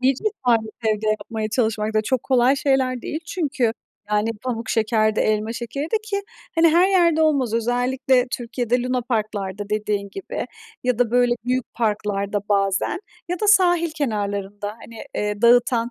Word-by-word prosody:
İyi 260 +1 +3
cesaret 245 - 0 0.2
evde 215 0 0
yapmaya 215 0 -2
çalışmak 220 -2 0
da 215 - +3
çok 255 +2 0
kolay 260 +1 +3
şeyler 260 -3 +1
değil 310 - -4
çünkü, 285 -10 0 0.4
yani, 210 +2 +1
pamuk 235 -3 -3
şeker 215 -1 +1
de - - +3
elma 215 +1 0
şekeri 240 +4 -4
de. 330 +8 0
Ki, 400 -2 -2 0.3
hani, 330 0 +5
her 345 +4 +4
yerde 340 -4 +4
olmaz, 275 -7 +2
özellikle 250 +2 +1
Türkiye'de 245 -1 -1
lunaparklarda 215 -6 -2
dediğin 210 -1 -1
gibi 390 - -5 0.4
ya 250 -2 +1
da, 245 -2 +2
böyle, 245 0 +3
büyük 255 0 -1
parklarda 205 -2 -1
bazen 195 - +1 0.3
ya 355 0 -3
da 425 - +1
sahil 350 -4 +4
kenarlarında, 205 -8 -3
hani, 230 -1 -10
eee, 210 +1 -2
dağıtan, 240 0 +4
240 Hz, 155 wpm, -22 LUFS, 215-265 Hz, 0.4 s, hani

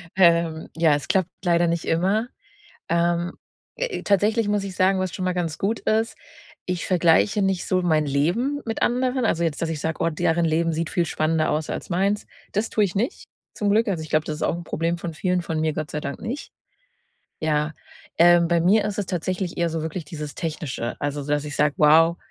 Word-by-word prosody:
Ähm, 170 -3 +3
ja, 165 -3 +4
es 145 -2 -5
klappt 185 -2 +2
leider 175 -1 +3
nicht 170 0 -1
immer. 195 +8 +1 0.6
Ähm, 170 0 +1 0.4
äh, - - -3
tatsächlich 210 +3 +2
muss 205 -1 +1
ich 195 -2 -6
sagen, 190 +1 +3
was 185 -2 -2
schon 185 - -3
mal 185 - +1
ganz 170 -3 -2
gut 215 +4 -1
ist, 220 +1 0 0.5
ich 180 -1 -2
vergleiche 185 +4 +3
nicht 190 -2 0
so 185 -1 +2
mein 155 -3 +2
Leben 180 - 0
mit 225 - -3
anderen. 250 0 +1
Also 170 -5 +1
jetzt, 160 -3 -1
dass 165 - -1
ich 160 -2 -3
sage: 160 +1 -2
„Oh, 165 - +3
deren 165 +2 +1
Leben 165 +1 +1
sieht 165 +1 -2
viel 175 - +1
spannender 155 0 +1
aus 155 +1 -1
als - - -5
meins.“ 195 +3 0 0.3
Das 210 +3 -1
tue 215 - +2
ich 190 -4 -1
nicht 235 - -2 0.3
zum 205 - 0
Glück. 220 +2 +3
Also, 175 -5 -1
ich 155 - -10
glaube, 155 0 +1
das 155 - -3
ist - - -4
auch - - +1
'n 170 - -6
Problem 165 +1 -1
von 170 -1 -5
vielen, 180 +1 0
von 160 -2 -3
mir 155 -1 0
Gott 155 0 -4
sei 150 - -3
Dank 140 -1 -5
nicht. 245 +6 -5 0.9
Ja, 150 0 0 0.4
ähm, 175 0 +6
bei 170 0 +3
mir 200 +5 +4
ist 210 -1 -3
es 200 - -1
tatsächlich 180 0 -3
eher 170 -1 +2
so 160 -1 -3
wirklich 160 +2 -4
dieses 150 -1 -7
Technische, 155 -7 -4
also 145 0 -2
s - - -9
dass 145 0 0
ich 150 0 -6
sage: 150 -1 +2
„Wow. 165 +3 +6
170 Hz, 220 wpm, -23 LUFS, 160-195 Hz, 0.9 s, ähm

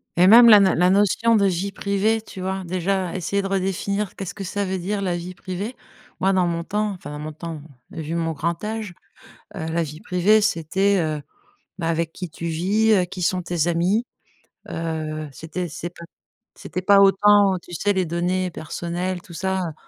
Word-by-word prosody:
Et 175 - +5
même 235 +4 +9
la 210 -2 +10
na 195 -2 +4
la 180 +2 +4
notion 205 +4 +3
de 200 - +3
vie 195 +1 0
privée, 205 +2 0
tu 190 - -10
vois, 190 +1 -3
déjà 185 +1 -1
essayer 195 +2 -1
de 195 - -3
redéfinir 195 +1 -2
qu'est-ce 195 -3 -6
que 200 - -7
ça 200 +2 -2
veut 190 0 -2
dire 200 +3 -2
la 180 -3 -1
vie 175 +1 -6
privée, 195 +8 -5 0.4
moi 195 +1 +2
dans 185 -2 +2
mon 170 0 -2
temps, 210 +3 -1
enfin 175 -7 -8
dans 150 - -6
mon 155 +1 -5
temps 160 0 -7 0.3
vu 160 +1 -5
mon 165 -1 -1
grand 165 +4 -3
âge, 215 -3 -4 0.6
heu, 160 - -5
la 170 +1 +1
vie 155 0 -7
privée 190 +5 +3
c'était, 195 +1 +1
heu 155 -2 -2 0.6
bah, 165 - -2
avec 165 0 -1
qui 180 -1 -7
tu 170 - -6
vis, 195 +7 +2
heu, 190 -4 +4
qui 180 +1 -8
sont 180 +1 +1
tes 170 -2 -1
amis, 180 +8 +1 0.6
heu, 155 -2 -4
c'était 165 +5 -5
c'est 165 +2 -6
p, 175 - -13 0.5
c'était 185 - -5
pas 200 +1 +5
autant 200 0 +5
tu 175 - -13
sais 205 +4 0
les 190 -2 0
données 180 +2 -1
personnelles 175 +3 -4
tout 175 - -14
ça, 190 +3 -1
heu 170 -4 -3
185 Hz, 200 wpm, -22 LUFS, 170-200 Hz, 0.6 s, la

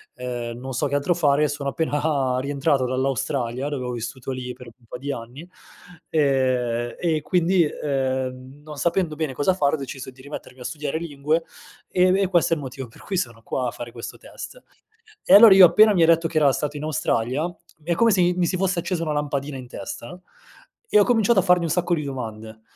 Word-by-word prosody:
ehm, 120 -2 -5
non 130 +1 -6
so 145 +4 0
che 140 - -2
altro 145 +5 +1
fare, 150 -3 +2
sono 145 -1 -3
appena 145 -4 0
rientrato 140 0 0
dall'Australia, 130 0 -2
dove 135 -4 -4
ho 125 - -3
vissuto 120 +2 -5
lì 125 -1 -5
per 125 0 -13
un 120 +1 -17
po' 125 - -7
di 140 +3 -4
anni, 125 +8 -9 0.6
ehm, 130 -5 +1
e 160 -3 0
quindi, 180 +3 +2
ehm, 130 -1 -3
non 150 -1 -10
sapendo 170 +1 0
bene 155 -3 -3
cosa 145 +8 +1
fare, 145 -6 +1
ho - - -5
deciso 135 -2 -7
di 130 +1 -17
rimettermi 135 -3 -9
a - - -9
studiare 150 +2 -3
lingue. 155 0 -1 0.5
Ehm, 185 0 +3
b - - +3
e 195 - +2
questo 175 -2 +2
è - - +3
il - - -7
motivo 130 -1 -7
per 115 - -18
cui 190 - -3
sono 115 -7 -3
qua 125 +1 -2
a - - -2
fare 120 0 -8
questo 115 0 -8
test." - - -10 0.6
E - - +3
allora 210 0 +10
io 190 -1 +10
appena 215 +4 +6
mi 175 -4 +3
ha - - +7
detto 165 0 +4
che 160 -1 -3
era 145 -3 +5
stato 150 +2 -3
in 145 - -6
Australia, 130 -2 -1
mi 175 - -6 0.4
è 170 - +3
come 230 +3 +4
se 190 -3 +3
mi 175 0 +3
mi 180 -1 +1
si 185 - -1
fosse 190 -1 0
accesa 170 -1 -2
una 155 - -2
lampadina 145 -1 -3
in 130 -1 -9
testa, 120 +6 -8 0.7
e - - +5
ho - - +6
cominciato 230 -3 +3
a - - +5
farmi 180 -2 +3
un - - -2
sacco 180 +1 0
di 150 - -3
domande. 110 -5 -7
145 Hz, 220 wpm, -23 LUFS, 130-170 Hz, 0.7 s, allora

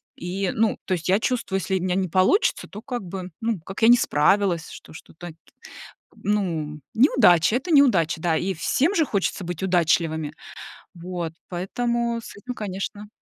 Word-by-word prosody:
И, 185 +2 -3
ну, 220 0 +1
то 185 - -1
есть 175 0 -3
я 195 +3 +4
чувствую, 230 -5 -1
если 190 +1 -1
у - - -5
меня 180 -1 0
не 190 -1 0
получится, 185 - +2
то, 210 - -10
как 245 -4 -5
бы, 185 0 -6
ну, 225 -5 -1
как 195 +6 -8
я 225 - +6
не 245 - +8
справилась, 175 0 +1
что - - -12
что-то, 175 +2 -11
т 160 - -13 0.9
ну, 165 -8 -1
неудача- 220 - +4
это 335 +6 -5
неудача, 175 - +4
да. 165 -2 +1
И 190 +1 -1
всем 290 - 0
же 320 -3 +3
хочется 200 -4 -2
быть 175 0 -5
удачливыми. 165 -4 +1 0.6
Вот, 175 -1 -5 0.2
поэтому 235 +6 -2
с - - -11
этим, 250 +5 -7
конечно. 205 -1 -5
190 Hz, 170 wpm, -23 LUFS, 175-225 Hz, 0.9 s, не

